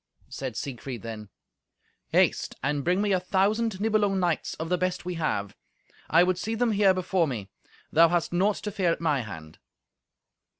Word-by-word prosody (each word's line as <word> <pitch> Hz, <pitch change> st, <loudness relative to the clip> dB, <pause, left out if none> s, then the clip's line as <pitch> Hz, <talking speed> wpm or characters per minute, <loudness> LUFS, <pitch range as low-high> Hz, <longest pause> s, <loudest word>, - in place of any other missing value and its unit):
Said 130 Hz, -4 st, -5 dB
Siegfried 130 Hz, -4 st, -6 dB
then, 110 Hz, -3 st, -7 dB, 0.8 s
"Haste -, -, +2 dB
and 140 Hz, +1 st, 0 dB
bring 180 Hz, +5 st, +2 dB
me 205 Hz, -, +1 dB
a 185 Hz, -, +3 dB
thousand 200 Hz, +3 st, +1 dB
Nibelung 205 Hz, -2 st, +2 dB
knights, 175 Hz, -3 st, -1 dB
of 160 Hz, 0 st, -5 dB
the 180 Hz, -, +2 dB
best 185 Hz, -1 st, -1 dB
we 180 Hz, -, -3 dB
have. 150 Hz, -, -2 dB, 0.5 s
I 170 Hz, +2 st, +6 dB
would 180 Hz, 0 st, +1 dB
see 225 Hz, +4 st, -2 dB
them 235 Hz, 0 st, +1 dB
here 200 Hz, -2 st, +4 dB
before 185 Hz, -2 st, +1 dB
me. 105 Hz, -7 st, -5 dB, 0.4 s
Thou 165 Hz, +1 st, +6 dB
hast 175 Hz, 0 st, 0 dB
naught 195 Hz, +4 st, +2 dB
to 210 Hz, -, -3 dB
fear 190 Hz, -4 st, +1 dB
at -, -, -2 dB
my 150 Hz, -4 st, +1 dB
hand." 80 Hz, -8 st, -9 dB
175 Hz, 175 wpm, -27 LUFS, 140-195 Hz, 0.8 s, I